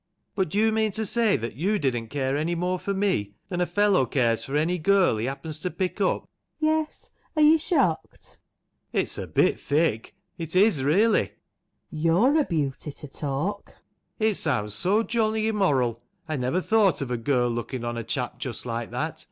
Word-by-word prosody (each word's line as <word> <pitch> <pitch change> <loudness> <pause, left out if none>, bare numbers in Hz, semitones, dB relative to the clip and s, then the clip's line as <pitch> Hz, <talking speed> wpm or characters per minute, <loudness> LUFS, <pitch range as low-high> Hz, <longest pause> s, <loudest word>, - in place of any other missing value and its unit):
But 190 -5 -1
do 200 - -3
you 220 +1 +3
mean 220 0 +1
to 220 +2 -1
say 225 0 +3
that 115 0 -5
you 195 - 0
didn't 120 - -1
care 135 +1 -2
any 160 +4 -1
more 180 +2 -1
for 200 - -3
me 190 - -1
than 180 -2 -2
a 175 - +1
fellow 205 -10 +2
cares 115 -3 +1
for 135 - -5
any 175 +4 0
girl 190 - +3
he 110 +3 -2
happens 150 +3 -5
to 180 - -2
pick 185 +2 -3
up? 190 - 0 0.3
FANNY. 310 0 +2
Yes. 315 0 -3 0.2
Are 305 - +4
you 315 +2 +6
shocked? 280 - -1 0.6
ALAN. - - +3
It's - - 0
a - - -5
bit - - +2
thick; 145 -6 0 0.2
it 165 +1 -4
is 185 -8 +4
really! 205 +10 +3
FANNY. - - -19 0.6
You're 170 - +3
a 295 - +2
beauty 150 -3 -2
to 150 - -10
talk! 150 +9 -3 0.5
ALAN. 220 0 +3
It - - -3
sounds 115 -9 0
so 195 - +2
jolly 220 -1 0
immoral. 135 - +1 0.3
I 155 - -2
never 130 +7 0
thought 210 -5 +2
of 125 - -6
a 125 - 0
girl 120 0 +1
looking 120 +1 -4
on 120 0 -3
a 115 - -4
chap 125 +1 -3
just 125 -3 -4
like 115 -1 -4
that - - -4
165 Hz, 200 wpm, -25 LUFS, 130-205 Hz, 0.6 s, you